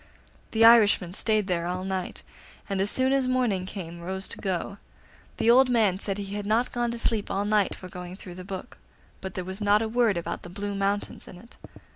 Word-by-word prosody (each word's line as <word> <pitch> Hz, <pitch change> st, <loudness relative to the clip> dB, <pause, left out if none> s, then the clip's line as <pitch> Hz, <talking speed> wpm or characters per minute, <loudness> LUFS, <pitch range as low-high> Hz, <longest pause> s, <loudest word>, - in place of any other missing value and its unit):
The 225 Hz, 0 st, +4 dB
Irishman 210 Hz, -6 st, +6 dB
stayed 215 Hz, 0 st, +1 dB
there 175 Hz, -3 st, -1 dB
all 180 Hz, +1 st, -3 dB
night, 190 Hz, -1 st, -4 dB, 0.4 s
and 195 Hz, -2 st, -1 dB
as 200 Hz, -, +1 dB
soon 260 Hz, +3 st, +2 dB
as 270 Hz, -2 st, +2 dB
morning 240 Hz, -8 st, 0 dB
came 175 Hz, -4 st, -7 dB
rose 190 Hz, +2 st, -4 dB
to -, -, -6 dB
go. 195 Hz, +1 st, -3 dB, 0.6 s
The 230 Hz, -, +4 dB
old 255 Hz, +1 st, +6 dB
man 215 Hz, -6 st, +2 dB
said 195 Hz, -1 st, -3 dB
he 200 Hz, -1 st, -5 dB
had 205 Hz, 0 st, -4 dB
not 225 Hz, +4 st, +1 dB
gone 240 Hz, -1 st, -1 dB
to 235 Hz, -, -4 dB
sleep 225 Hz, -2 st, -1 dB
all 200 Hz, +1 st, -1 dB
night 210 Hz, -1 st, +2 dB
for 185 Hz, -, -10 dB
going 180 Hz, 0 st, -8 dB
through 185 Hz, -2 st, -10 dB
the 185 Hz, +1 st, -9 dB
book, 190 Hz, +4 st, -8 dB, 0.4 s
but 190 Hz, -, -6 dB
there 185 Hz, -, -4 dB
was 190 Hz, +3 st, -5 dB
not 205 Hz, +1 st, +4 dB
a -, -, -1 dB
word 225 Hz, -4 st, +2 dB
about 170 Hz, -, -4 dB
the 175 Hz, -, -10 dB
Blue 200 Hz, +2 st, -4 dB
Mountains 200 Hz, +1 st, -2 dB
in -, -, -11 dB
it. 230 Hz, +6 st, -16 dB
200 Hz, 220 wpm, -26 LUFS, 185-225 Hz, 0.6 s, Irishman